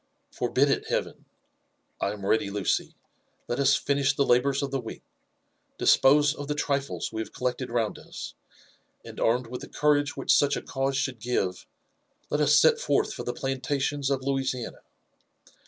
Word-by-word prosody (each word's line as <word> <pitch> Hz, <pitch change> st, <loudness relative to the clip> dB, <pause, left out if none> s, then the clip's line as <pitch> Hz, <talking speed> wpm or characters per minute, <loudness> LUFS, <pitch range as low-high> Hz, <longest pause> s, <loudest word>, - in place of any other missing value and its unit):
Forbid -, -, +1 dB
it, -, -, -1 dB
Heaven! -, -, -3 dB, 0.4 s
— -, -, -34 dB
^I 100 Hz, -, +1 dB
am 100 Hz, -2 st, -8 dB
ready, 100 Hz, 0 st, +2 dB
Lucy. 100 Hz, -1 st, -1 dB, 0.5 s
Let 120 Hz, -, -2 dB
us 140 Hz, 0 st, +4 dB
finish 140 Hz, 0 st, +1 dB
the 140 Hz, -, +2 dB
labours 135 Hz, +3 st, +2 dB
of 135 Hz, -, -3 dB
the 135 Hz, -, -1 dB
week, 115 Hz, -, -8 dB, 0.7 s
dispose 145 Hz, +2 st, +5 dB
of 145 Hz, -2 st, -7 dB
the 150 Hz, -, -1 dB
trifles 140 Hz, -1 st, -2 dB
we 110 Hz, -, -2 dB
have 110 Hz, -, -7 dB
collect 125 Hz, +1 st, -2 dB
ed 130 Hz, -, -4 dB
round 115 Hz, -3 st, -1 dB
us, -, -, -8 dB, 0.7 s
and -, -, -9 dB
armed 120 Hz, +2 st, +2 dB
with 125 Hz, +2 st, -7 dB
the 145 Hz, -, -9 dB
courage 145 Hz, -1 st, +1 dB
which -, -, +2 dB
such 145 Hz, 0 st, +3 dB
a -, -, -6 dB
cause 135 Hz, 0 st, -1 dB
should 130 Hz, -3 st, -2 dB
give, 100 Hz, -6 st, -2 dB, 0.6 s
let 150 Hz, -, +1 dB
us 150 Hz, 0 st, +5 dB
set 460 Hz, -, +5 dB
forth -, -, +1 dB
for -, -, -6 dB
the -, -, -2 dB
plantations 135 Hz, +1 st, -2 dB
of 135 Hz, -1 st, -1 dB
Louisiana. 135 Hz, -3 st, -2 dB
135 Hz, 175 wpm, -27 LUFS, 125-145 Hz, 0.7 s, dispose